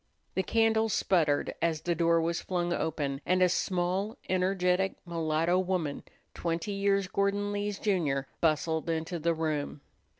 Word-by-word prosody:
The 190 - +1
candle 225 +1 +2
sputtered 165 -7 +1
as 160 -2 +1
the 175 +1 0
door 170 0 +3
was 170 +1 -1
flung 175 -2 -1
open, 145 -4 -2
and 185 +1 +3
a - - +6
small, 185 +4 -1
energetic 185 0 +1
mulatto 165 +1 +1
woman, 180 -6 -1 0.3
twenty 170 +4 -2
years 195 -1 +1
Gordon 200 +1 0
Lee's 205 0 -2
junior, 150 -11 0
bustled 160 +1 +1
into 165 +1 -2
the 165 +1 +1
room. 155 -2 -2
175 Hz, 140 wpm, -29 LUFS, 160-190 Hz, 0.3 s, a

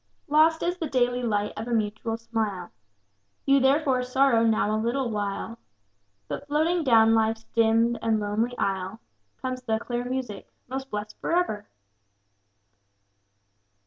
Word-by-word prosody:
Lost 315 +2 +4
is 355 +1 -1
the 320 - -3
daily 245 -1 +1
light 210 -3 -1
of 220 +2 -5
mutual 225 0 -1
smile, 215 -6 -3 0.7
You 275 0 +5
therefore 270 -1 +2
sorrow 250 -2 +3
now 215 -1 +2
a 215 - -1
little 240 +1 -1
while; 210 +2 -4 0.7
But - - -6
floating 320 +4 +1
down 225 -4 +5
life's 225 0 +1
dimmed 230 +1 +3
and 225 -1 +1
lonely 215 +4 -1
aisle 195 +2 -2 0.4
Comes 255 0 -3
the 220 -3 0
clear 240 +1 -3
music: 250 -4 -5 0.2
'Most 265 +1 -5
blessed 210 0 -5
for 335 - -1
ever!' 215 -13 -1
230 Hz, 135 wpm, -26 LUFS, 220-265 Hz, 0.7 s, You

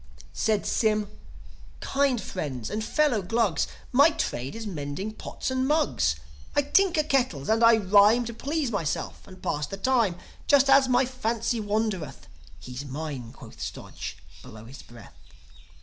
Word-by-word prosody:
Said 215 -2 0
Sym: 215 -2 +1 0.7
"Kind 275 -3 +1
friends, 135 - -5
and 215 +1 -2
fellow 265 -2 +2
Glugs; 200 -2 0 0.2
My 280 +5 +6
trade 130 - -3
is 225 0 -6
mending 180 +3 -4
pots 220 - -5
and 260 0 0
mugs. 295 - +2 0.4
I 290 - +3
tinker 355 0 +3
kettles, 245 - 0
and 225 +1 +3
I 230 0 +7
rhyme 210 +4 +5
To 235 - -5
please 285 +2 -2
myself 165 -8 -3
and 185 -1 -14
pass 150 0 -1
the 195 - -6
time, 230 -4 +2 0.3
Just 275 -1 +5
as 270 -1 +6
my 255 +1 +4
fancy 235 -2 -2
wandereth." 205 - -2 0.3
("He's 125 +10 -8
minel" 140 -4 -6
quoth - - -13
Stodge, - - -6 0.2
below 110 0 -12
his 135 +4 -11
breath.) 120 -3 -15
215 Hz, 150 wpm, -26 LUFS, 155-260 Hz, 0.7 s, I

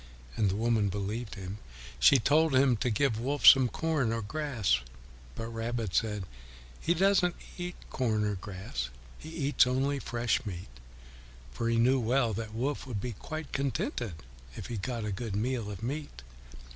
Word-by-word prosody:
And 105 -3 +2
the 95 - -1
woman 110 -2 +2
believed 105 +4 -4
him. 95 +1 -7 0.4
She 135 - +7
told 150 +4 +3
him 130 -1 +5
to 125 - 0
give 115 0 +1
Wolf 140 +4 -1
some 130 -2 +9
corn 155 -7 0
or 115 -1 -2
grass. 115 - 0 0.6
But 115 0 -5
Rabbit 115 -3 -3
said, 105 -3 0 0.6
"He 170 - +1
doesn't 185 -1 +3 0.2
eat 180 0 -5 0.2
corn 110 -5 +1
or 105 - 0
grass; 90 - -5 0.3
he 155 - -9
eats 145 -5 +2
only 135 +2 +1
fresh 120 0 0
meat," 90 - -6 0.8
for 115 - -2
he 115 - +2
knew 130 +3 +4
well 120 0 +2
that 110 +1 -5
Wolf 135 +3 -2
would 115 -5 -3
be 120 +5 -3
quite 155 +8 -7
contented 130 -6 -2 0.4
if - - -7
he 120 - -4
got 115 +2 -3
a 105 - -2
good 105 +1 -4
meal 115 0 -1
of 100 0 -7
meat. 140 - -5
120 Hz, 170 wpm, -30 LUFS, 105-135 Hz, 0.8 s, some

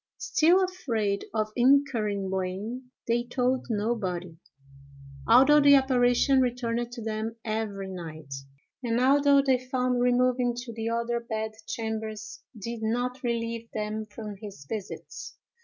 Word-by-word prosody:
Still 375 -7 +3
afraid 225 - -1
of 215 -1 -1
incurring 240 -7 +2
blame, 190 +7 -4 0.2
they 235 +1 +2
told 250 +1 -1
nobody, 200 -6 -2 0.9
although 265 +6 +7
the 285 0 +8
apparition 260 0 +4
returned 240 -1 -1
to 235 -2 -7
them 220 +1 -3
every 215 -3 -3
night; 160 -6 -8 0.5
and 235 -2 0
although 280 +2 +5
they 260 -2 +3
found 255 -1 0
removing 250 0 +2
to 240 -1 -6
the 225 0 -3
other 235 +1 -1
bed 220 -2 -3 0.2
chambers 220 -1 -5 0.2
did 230 +2 -5
not 245 +3 -1
relieve 230 -1 -2
them 215 0 -3
from 210 -1 -8
his 195 -8 -10
visits. 210 +1 -7
230 Hz, 125 wpm, -27 LUFS, 215-250 Hz, 0.9 s, the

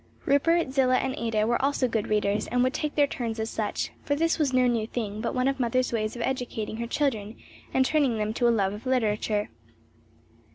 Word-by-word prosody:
Rupert, 285 +2 +2
Zillah 255 -1 +3
and 265 0 -1
Ada 225 -2 0
were 240 +3 0
also 275 -2 +2
good 225 -3 -1
readers, 210 -1 0
and 245 0 +1
would 255 +1 +1
take 300 -1 -3
their 290 - +5
turns 235 -5 -4
as 220 +1 -2
such; 215 -2 -2
for 285 - 0
this 330 +2 +1
was 290 -4 +2
no 255 -1 +3
new 230 -3 +1
thing, 215 -3 -4
but 235 - -2
one 255 +1 +1
of 275 0 0
the - - -3
mother's 250 +1 +1
ways 215 0 -1
of 240 - -3
educating 240 -4 -3
her 235 0 -3
children 230 -6 -1 0.4
and 260 0 +3
training 275 -6 +2
them 215 0 -1
to 240 +1 +2
a - - +5
love 200 -4 +1
of 215 +5 -8
literature. 215 -4 0
240 Hz, 220 wpm, -27 LUFS, 220-265 Hz, 0.4 s, their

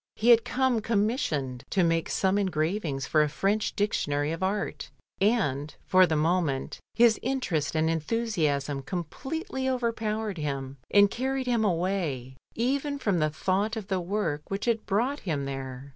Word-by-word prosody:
He 230 - +1
had 230 -1 +7
come 255 -3 +1
commissioned 200 - -1
to 190 - +2
make 165 -1 +1
some 190 +1 +1
engravings 160 -5 -1
for 155 - +3
a 150 - +2
French 205 +7 0
dictionary 145 -8 0
of 165 - -4
art, 195 +2 -2 0.3
and 155 - +1
for 185 -1 +5
the 160 - 0
moment 155 -3 0 0.2
his 230 -1 +5
interest 210 - -1
and 160 0 +2
enthusiasm 155 -6 0
completely 265 - -4
overpowered 220 -5 -1
him, 140 -2 -4
and 205 -1 +5
carried 265 +1 -1
him 240 -3 +1
away, 170 - -1 0.2
even 280 +4 0
from 200 -10 0
the 155 0 +2
thought 195 +8 0
of 215 -3 -6
the 190 -2 +1
work 175 -5 -1
which 195 +1 -3
had 230 -2 0
brought 245 +8 +1
him 150 -7 -2
there. 135 0 -6
190 Hz, 155 wpm, -27 LUFS, 150-225 Hz, 0.3 s, had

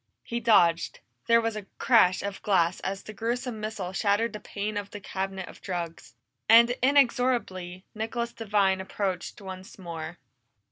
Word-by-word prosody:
He 235 - -3
dodged; 175 -7 +3 0.3
there 230 0 +6
was 225 -1 -1
a 210 -2 -6
crash 190 -7 +4
of 200 -1 -5
glass 185 -3 +2
as 195 0 -4
the 215 - -9
gruesome 235 +1 -3
missile 210 -4 -4
shattered 205 +3 +1
the 210 - -5
pane 210 +1 -4
of 205 -1 -3
the 205 - -8
cabinet 190 -1 -4
of - - -13
drugs. 170 -9 -5 0.3
And 235 +2 +8
inexorably, 245 -9 +2
Nicholas 235 +2 -3
Devine 200 -4 +1
approached 190 +1 -3
once 190 -1 -9
more. 170 -2 -7
200 Hz, 150 wpm, -27 LUFS, 185-230 Hz, 0.3 s, And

